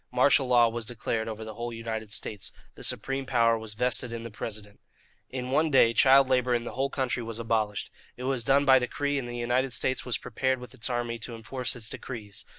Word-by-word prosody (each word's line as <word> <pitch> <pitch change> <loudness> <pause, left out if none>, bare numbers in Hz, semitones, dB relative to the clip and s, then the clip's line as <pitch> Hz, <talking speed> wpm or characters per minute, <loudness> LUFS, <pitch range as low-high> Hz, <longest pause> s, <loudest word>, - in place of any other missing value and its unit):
Martial 130 +1 +4
law 120 -2 +6
was 115 0 -3
declared 110 -1 -2
over 110 0 -5
the 110 - -7
whole 120 +2 -5
United 110 -2 -5
States. 105 -2 -1 0.2
The - - -12
supreme 135 0 -2
power 115 -3 +4
was 110 -1 -5
vested 125 +1 0
in 115 -1 -5
the 115 - -7
President. 105 -1 -7 0.5
In 125 0 -4
one 155 +4 +3
day, 120 -5 +5
child 135 +2 +6
labour 125 -1 +2
in 120 - -1
the - - -5
whole 135 +2 0
country 130 -3 -1
was 115 -1 -5
abolished. 110 -3 -1 0.3
It 125 - -7
was 130 -2 0
done 140 +3 +3
by 130 -1 +7
decree, 145 +3 -1
and 125 - -5
the 120 0 -5
United 125 +2 0
States 130 - 0
was 125 - -1
prepared 130 +3 -1
with 125 0 -10
its 130 -1 -4
army 120 -1 -2
to 115 +1 -6
enforce 125 +3 -2
its 115 -3 -2
decrees. 105 -5 -7
120 Hz, 220 wpm, -28 LUFS, 115-130 Hz, 0.5 s, by